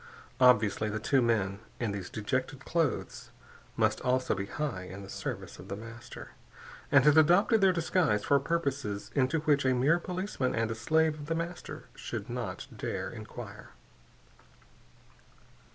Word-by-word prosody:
Obviously, 110 -4 +4
the 105 - -2
two 130 +5 +2
men 100 -5 +1 0.2
in 115 -4 -1
these 100 -3 -5
dejected 130 +6 -3
clothes 165 -4 -1 0.5
must - - +2
also 130 0 +1
be 100 -1 -3
high 145 -7 -3
in 95 +2 -8
the 95 - -10
service - - -5
of - - -10
The 100 - -4
Master, 115 +3 -10 0.6
and - - +6
had 150 +1 +7
adopted 190 +8 +5
their 190 -1 +6
disguise 165 - +1
for 140 - +4
purposes 140 -9 -2
into 140 +3 +2
which 150 -3 +3
a 130 -1 +3
mere 145 +8 +3
policeman 180 -7 -2
and 115 0 0
a - - 0
slave 155 +7 +1
of 145 - -8
The 165 - 0
Master 170 +1 -5
should - - -6
not - - -4
dare - - -3
enquire. - - -9
130 Hz, 150 wpm, -30 LUFS, 110-160 Hz, 0.6 s, had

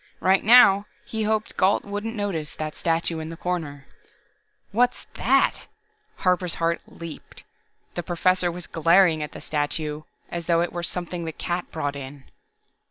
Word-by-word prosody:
Right 190 +1 +3
now, 210 -3 +7 0.2
he 220 - -3
hoped 215 0 -1
Gault 190 +1 +3
wouldn't 205 +3 -4
notice 185 -8 -3
that 155 -1 -4
statue 165 0 0
in 160 0 -5
the 165 - -8
corner 160 -6 -4 0.9
"What's 245 +4 +1
that!" - - +2 0.5
Harper's 180 -1 +1
heart 170 0 0
leaped. 165 -2 -10 0.5
The 175 - -3
Professor 175 +1 +1
was 175 +1 -7
glaring 165 0 +4
at 150 - -5
the - - -9
statue, 150 0 -2 0.3
as 170 -1 -4
though 170 -1 +3
it 175 - -2
were 175 - -3
something 175 0 -3
the 160 - -3
cat 175 +3 -4
brought 145 -3 -2
in. 140 0 -8
170 Hz, 155 wpm, -24 LUFS, 160-190 Hz, 0.9 s, now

